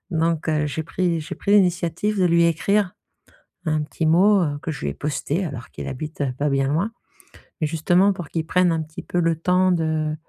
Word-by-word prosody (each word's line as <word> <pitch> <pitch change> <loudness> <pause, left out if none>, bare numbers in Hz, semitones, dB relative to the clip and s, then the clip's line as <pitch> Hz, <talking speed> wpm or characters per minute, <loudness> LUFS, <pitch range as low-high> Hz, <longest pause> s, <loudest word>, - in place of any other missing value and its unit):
Donc 165 -1 0
heu, 150 -1 +1
j'ai 150 +2 -3
pris 170 +1 -1
j'ai 155 - -6
pris 200 - -1
l'initiative 185 +1 +2
de 185 - +3
lui 170 -1 +4
écrire 190 +4 +1 0.7
un 155 -1 +1
petit 160 +2 -3
mot, 195 +6 +5
heu, 145 -2 -2
que 165 - -3
je 150 - -6
lui - - -2
ai 70 - -4
posté, 150 - -2
alors 135 -7 -6
qu'il - - -7
habite 150 +2 -5
pas 145 0 0
bien 135 0 +1
loin, 175 +10 0 0.7
mais 155 - +1
justement 175 +5 +3
pour 175 -5 -7
qu'il 165 -1 -2
prenne 180 +1 +2
un 165 -1 -1
petit 155 0 -9
peu 175 - -1
le 165 -1 +1
temps 180 +3 +2
de, 155 -2 0
165 Hz, 210 wpm, -22 LUFS, 155-180 Hz, 0.7 s, mot